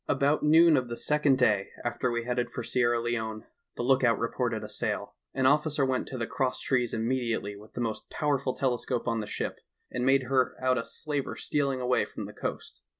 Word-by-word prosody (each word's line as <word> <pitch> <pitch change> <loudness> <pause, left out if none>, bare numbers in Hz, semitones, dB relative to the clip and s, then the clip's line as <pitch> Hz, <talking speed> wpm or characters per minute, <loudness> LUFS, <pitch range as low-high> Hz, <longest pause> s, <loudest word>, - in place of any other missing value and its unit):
"About 145 +2 +2
noon 160 +1 +6
of 125 -1 0
the 120 0 -5
second 150 -3 +2
day 105 -6 +2 0.2
after 120 +1 0
we 120 -1 -1
headed 125 0 -1
for - - -5
Sierra 120 -1 +2
Leone, 110 -2 -3 0.3
the - - -3
lookout 130 -2 +4
reported 115 -1 -1
a - - -5
sail. - - -3 0.2
An 130 - +1
officer 150 +1 +3
went 130 -1 -1
to 130 - -5
the 115 - -1
cross 130 +2 -1
trees 125 -3 +1
immediately 115 -3 -1
with 105 +2 -14
the - - -4
most 110 -2 -3
powerful 140 -3 0
telescope 125 -2 -1
on 115 -2 +1
the 105 - -4
ship, - - -4 0.3
and 125 - -2
made 135 +1 +4
her 130 0 +1
out 130 -1 +2
a 115 - -4
slaver 145 -3 -3
stealing 140 -3 0
away 125 0 +2
from - - -7
the - - -9
coast. - - -5
125 Hz, 205 wpm, -28 LUFS, 115-135 Hz, 0.3 s, noon